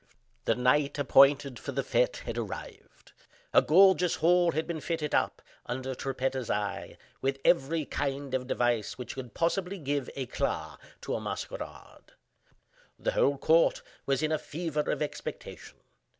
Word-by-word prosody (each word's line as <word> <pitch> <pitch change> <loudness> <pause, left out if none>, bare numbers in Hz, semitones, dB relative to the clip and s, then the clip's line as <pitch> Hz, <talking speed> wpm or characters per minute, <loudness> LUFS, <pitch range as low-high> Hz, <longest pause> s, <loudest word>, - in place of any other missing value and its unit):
The - - +3
night 140 +4 +2
appointed 140 -2 +4
for 140 - -6
the 135 +1 -1
fete - - +1
had - - -4
arrived. 435 -3 -8 0.4
A - - +7
gorgeous 180 0 +5
hall 175 +1 +3
had 160 - -1
been 165 -3 -4
fitted 160 -3 -2
up, - - 0 0.2
under 130 +2 -3
Trippetta's 130 -1 -2
eye, 100 -1 -3 0.2
with 135 0 0
every 160 -1 +3
kind 140 -1 -3
of 130 -1 -1
device 120 -4 0
which 125 - -6
could 125 -5 -8
possibly 180 +3 0
give 145 -4 -2
eclat 130 -3 -3 0.2
to - - -4
a - - -2
masquerade. - - -7 0.8
The - - -1
whole 140 0 +2
court 160 +4 +3 0.2
was 135 +1 +1
in 155 - +1
a 155 - +1
fever 155 -2 -3
of - - 0
expectation. 150 - -7
140 Hz, 150 wpm, -29 LUFS, 130-165 Hz, 0.8 s, A